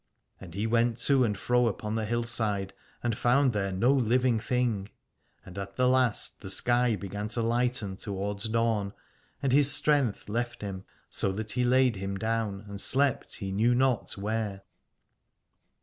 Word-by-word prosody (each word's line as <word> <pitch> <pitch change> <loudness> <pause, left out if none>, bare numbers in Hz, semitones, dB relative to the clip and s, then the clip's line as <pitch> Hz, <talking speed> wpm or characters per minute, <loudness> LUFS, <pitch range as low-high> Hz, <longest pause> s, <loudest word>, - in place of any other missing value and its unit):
And 90 -3 -11
he 105 +2 -2
went 115 +1 +1
to 135 -2 +4
and 105 -4 -1
fro 125 +3 +2
upon 105 0 -3
the 110 -1 -1
hillside 115 -4 -1 0.3
and 120 -2 0
found 125 +2 +2
there 100 -2 -1
no 115 +8 +2
living 125 -2 +2
thing: 115 -3 -1 0.6
and 90 +2 -8
at 100 0 -7
the 125 +3 +2
last 130 -3 +1
the 95 - -8
sky 120 +3 +3
began 100 +2 -5
to 115 +1 -2
lighten 115 -4 0
towards 100 +1 -3
dawn, 110 -3 0 0.5
and 135 - +1
his 145 +1 +5
strength 140 -7 +2
left 120 +3 -3
him, 95 -2 -6 0.2
so 95 - +1
that 110 +2 -4
he 125 +4 0
laid 125 -2 +3
him 95 0 -4
down 110 -1 -2
and 100 0 -5
slept 140 0 +2
he 95 -3 -5
knew 115 +5 +2
not 130 -2 +1
where. 105 -1 -3
115 Hz, 165 wpm, -28 LUFS, 100-125 Hz, 0.6 s, his